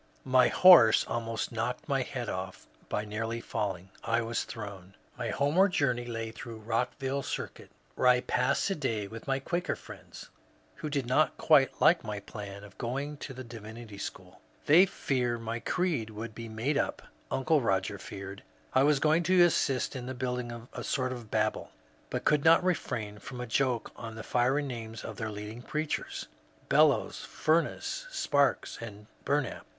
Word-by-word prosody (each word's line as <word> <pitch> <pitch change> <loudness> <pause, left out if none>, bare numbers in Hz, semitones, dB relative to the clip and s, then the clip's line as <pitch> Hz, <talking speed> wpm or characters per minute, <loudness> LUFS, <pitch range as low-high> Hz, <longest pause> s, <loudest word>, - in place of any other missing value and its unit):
^* - - -35 0.2
My 130 -1 +5
horse 170 -12 +8
almost 115 -1 -2
knocked - - -3
my - - +1
head - - -4
off - - -5 0.2
by 105 - -1
nearly 115 +2 -3
falling. 95 -5 -3
I 115 0 +1
was 115 +1 -2
thrown." 100 -4 -8 0.2
My 120 -2 -3
homeward 165 - +3
journey 125 -6 +1
lay 115 -1 -4
through 115 +1 -8
Rockville 125 +5 -1
Circuit, - - -5 0.2
where 125 - +1
I 125 0 +6
passed 125 +2 +1
a - - +3
day 115 - -2
with 115 +5 -10
my 135 -1 +2
Quaker 175 +6 -2
friends, - - -12 0.5
who 155 - -4
did 140 -3 -1
not 130 +6 +2
quite 140 -4 +4
like 170 - +5
my 105 -2 -4
plan 100 -1 -8
of 100 -1 -14
going 140 +5 -3
to 140 - -7
the 130 0 -7
Divinity 110 -2 -9
School. - - -8
" - - -32
They 175 +6 +7
fear 125 -9 -1
my 115 0 -4
creed 160 -8 -1
will 110 +2 -6
be 115 +1 -8
made 120 +7 0
up." - - -2 0.3
Uncle 150 +3 +2
Roger 95 -3 0
feared 100 0 -8 0.3
I 130 - +5
was 145 0 +4
going 155 +3 +3
to 185 -1 +7
assist 140 -6 +2
in 130 0 -5
building 125 -2 -4
a - - -5
sort 130 -1 -1
of 120 -4 -7
Babel, 110 0 0 0.4
but - - -3
could 150 -1 +3
not 165 +2 +6
refrain 110 - -2
&om 125 - -7
a 125 - -3
joke 125 0 0
on 115 -1 -7
the 110 - -7
fiery 130 +5 +2
names 115 -4 -6
of - - -7
their 110 -2 -3
leading 105 +3 -7
preachers, 155 +4 -3 0.2
— - - -32
Bel - - +7
lows, - - -1
Fumess, 170 - 0
Sparks, 145 - +1
and 105 -2 -8 0.2
Bumap. 145 -3 -1
120 Hz, 175 wpm, -30 LUFS, 110-140 Hz, 0.5 s, horse